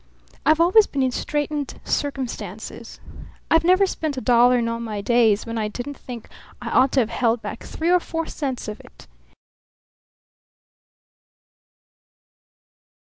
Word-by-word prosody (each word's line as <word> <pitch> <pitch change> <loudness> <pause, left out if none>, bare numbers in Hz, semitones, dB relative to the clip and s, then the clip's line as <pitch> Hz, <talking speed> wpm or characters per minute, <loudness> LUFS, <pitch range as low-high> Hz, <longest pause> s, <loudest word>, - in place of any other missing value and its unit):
I've 310 +1 +5
always 370 +6 +6
been 275 -2 -1
in 260 - +1
straitened 295 +1 -3
circumstances. 275 -4 -4 0.5
I 325 - +6
never 370 +3 +5
spent 315 -6 -3
a - - 0
dollar 245 0 +5
in 235 -1 0
all 230 0 -2
my 220 -3 -4
days 220 -1 +3
when 230 -1 -4
I 215 - -1
didn't 245 +7 -6
think 245 -3 -9 0.3
I - - -5
ought 265 +1 +4
to 270 - +4
have 225 - -2
held 235 -2 +1
back - - -6
three 330 +2 -2
or 360 - +5
four 330 -1 -4
cents 270 -7 -4
of 210 0 -6
it. - - -16
260 Hz, 145 wpm, -23 LUFS, 235-310 Hz, 0.5 s, always